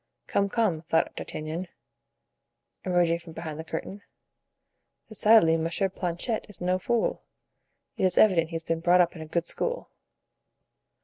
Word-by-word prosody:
"Come, 200 Hz, 0 st, 0 dB
come," 200 Hz, -8 st, +1 dB
thought 165 Hz, 0 st, 0 dB
D'Artagnan, 160 Hz, +4 st, -5 dB, 1.2 s
emerging 175 Hz, -2 st, +2 dB
from 170 Hz, -1 st, -12 dB
behind 160 Hz, -2 st, -6 dB
the -, -, -4 dB
curtain, 165 Hz, +5 st, -6 dB, 1.1 s
"decidedly 215 Hz, -6 st, +5 dB
Monsieur 165 Hz, +4 st, 0 dB
Planchet 180 Hz, +5 st, -3 dB
is 205 Hz, -, -3 dB
no 180 Hz, +1 st, 0 dB
fool; 235 Hz, +4 st, 0 dB, 0.8 s
it -, -, +1 dB
is 185 Hz, -1 st, +1 dB
evident 170 Hz, -6 st, +5 dB
he 165 Hz, -, -7 dB
has 165 Hz, -, -3 dB
been 165 Hz, 0 st, -1 dB
brought 175 Hz, +2 st, +4 dB
up 175 Hz, +1 st, +1 dB
in 160 Hz, -, -8 dB
a 160 Hz, -, -7 dB
good 170 Hz, +1 st, -1 dB
school." -, -, -3 dB
175 Hz, 145 wpm, -27 LUFS, 165-195 Hz, 1.2 s, decidedly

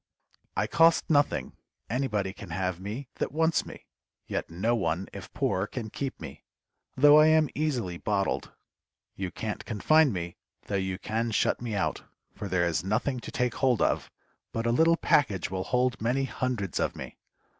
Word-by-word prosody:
I 100 Hz, -, +2 dB
cost 165 Hz, +6 st, +4 dB
nothing, 145 Hz, -1 st, +2 dB, 0.3 s
anybody 105 Hz, -6 st, -1 dB
can 100 Hz, -3 st, -10 dB
have 90 Hz, 0 st, -2 dB
me 110 Hz, +8 st, -5 dB
that -, -, -1 dB
wants 160 Hz, +2 st, +1 dB
me, -, -, -11 dB, 0.4 s
yet -, -, -3 dB
no 105 Hz, +8 st, 0 dB
one 95 Hz, -4 st, -1 dB
if -, -, -9 dB
poor 95 Hz, +3 st, 0 dB
can 110 Hz, -3 st, -6 dB
keep 135 Hz, -2 st, -4 dB
me, -, -, -9 dB, 0.5 s
though 145 Hz, +3 st, +7 dB
I 155 Hz, -, +7 dB
am 155 Hz, -2 st, +4 dB
easily 125 Hz, -, -1 dB
bottled. 100 Hz, -2 st, -1 dB, 0.6 s
You 95 Hz, -2 st, -3 dB
can't 105 Hz, +3 st, -5 dB
confine 150 Hz, +7 st, +3 dB
me, 85 Hz, -3 st, -5 dB, 0.3 s
though -, -, -6 dB
you 95 Hz, -1 st, -1 dB
can 115 Hz, +4 st, -2 dB
shut 110 Hz, -, +1 dB
me 115 Hz, -3 st, -3 dB
out, 100 Hz, -, -1 dB, 0.3 s
for 105 Hz, -, -6 dB
there 90 Hz, -2 st, +1 dB
is 85 Hz, 0 st, 0 dB
nothing 110 Hz, +7 st, 0 dB
to -, -, -8 dB
take 125 Hz, -2 st, 0 dB
hold 125 Hz, -2 st, +2 dB
of, -, -, +1 dB, 0.4 s
but 115 Hz, 0 st, -3 dB
a 115 Hz, -, +2 dB
little 165 Hz, +7 st, +4 dB
package 100 Hz, -, +2 dB
will 95 Hz, -1 st, -2 dB
hold 125 Hz, -1 st, +1 dB
many 125 Hz, +4 st, +1 dB
hundreds 125 Hz, -8 st, -2 dB
of -, -, 0 dB
me. -, -, -9 dB
115 Hz, 175 wpm, -28 LUFS, 95-135 Hz, 0.6 s, though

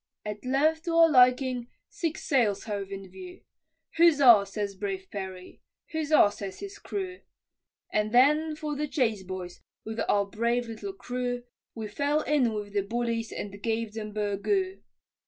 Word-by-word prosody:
At 210 Hz, 0 st, -5 dB
length 305 Hz, +5 st, +1 dB
to 335 Hz, -1 st, -1 dB
our 330 Hz, -1 st, +6 dB
liking, 250 Hz, -2 st, +4 dB, 0.2 s
six 330 Hz, -3 st, -4 dB
sails 230 Hz, -8 st, +2 dB
hove 200 Hz, -3 st, -4 dB
in 195 Hz, -1 st, -7 dB
view, 365 Hz, -, -10 dB, 0.6 s
Huzzah! 275 Hz, -11 st, +7 dB
says 200 Hz, 0 st, -3 dB
brave 195 Hz, -1 st, -4 dB
Perry, 190 Hz, -2 st, -7 dB, 0.3 s
huzzah! 310 Hz, -9 st, +4 dB
says 195 Hz, -2 st, -7 dB
his 400 Hz, 0 st, -8 dB
crew, 370 Hz, -2 st, -5 dB, 0.7 s
And 210 Hz, 0 st, 0 dB
then 300 Hz, +6 st, +4 dB
for 300 Hz, -1 st, -4 dB
the 300 Hz, +1 st, -2 dB
chase, 230 Hz, -8 st, 0 dB
boys, 185 Hz, -1 st, -7 dB, 0.2 s
with 220 Hz, +1 st, -5 dB
our 200 Hz, -1 st, +3 dB
brave 235 Hz, +4 st, -1 dB
little 305 Hz, -, -6 dB
crew, 245 Hz, -7 st, -3 dB, 0.3 s
We 220 Hz, -2 st, -4 dB
fell 285 Hz, +8 st, 0 dB
in 280 Hz, -7 st, +2 dB
with 205 Hz, -1 st, -5 dB
the 205 Hz, -, +2 dB
bullies 230 Hz, +2 st, -2 dB
and 200 Hz, 0 st, -6 dB
gave 225 Hz, -1 st, -2 dB
them 215 Hz, -1 st, -5 dB
"burgoo." 215 Hz, -, -1 dB
235 Hz, 155 wpm, -28 LUFS, 205-300 Hz, 0.7 s, Huzzah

